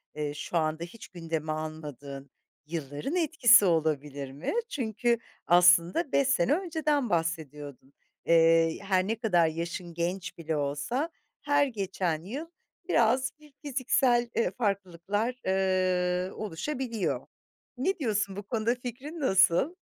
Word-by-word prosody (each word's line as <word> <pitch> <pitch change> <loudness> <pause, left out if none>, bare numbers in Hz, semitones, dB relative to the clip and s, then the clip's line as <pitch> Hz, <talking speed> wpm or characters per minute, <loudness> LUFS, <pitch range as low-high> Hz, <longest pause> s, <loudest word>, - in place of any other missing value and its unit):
eee, 150 -1 -3
şu 170 +3 -3
anda 160 +1 0
hiç 205 +6 -10
gündeme 165 -3 -4
almadığın 145 -3 -6 0.4
yılların 150 - -4
etkisi 275 - +6
olabilir 150 -5 0
mi? 145 - -4 0.2
Çünkü 235 -2 0 0.3
aslında 175 - +5
5 275 -1 +3
sene 275 -1 +3
önceden 310 - 0
bahsediyordun. 150 -5 -3 0.3
Eee, 165 0 +4
her 190 -1 +1
ne 225 - 0
kadar 175 -8 +3
yaşın 170 +2 -5
genç 175 +3 -3
bile 160 -1 -3
olsa 145 - -2 0.3
her 290 -1 +3
geçen 190 -7 -2
yıl 275 - -6 0.4
biraz 255 +2 +3
bir 300 -2 -19
fiziksel, 255 -3 +1
eee, 230 - +1
farklılıklar, 200 +1 -2
ııı, 185 -1 +1
oluşabiliyor. 215 - -3 0.5
Ne 370 +9 0
diyorsun? 210 -6 -1
Bu 205 - -6
konuda 230 +3 0
fikrin 255 +7 -7
nasıl? 195 - +3
185 Hz, 120 wpm, -28 LUFS, 165-245 Hz, 0.5 s, etkisi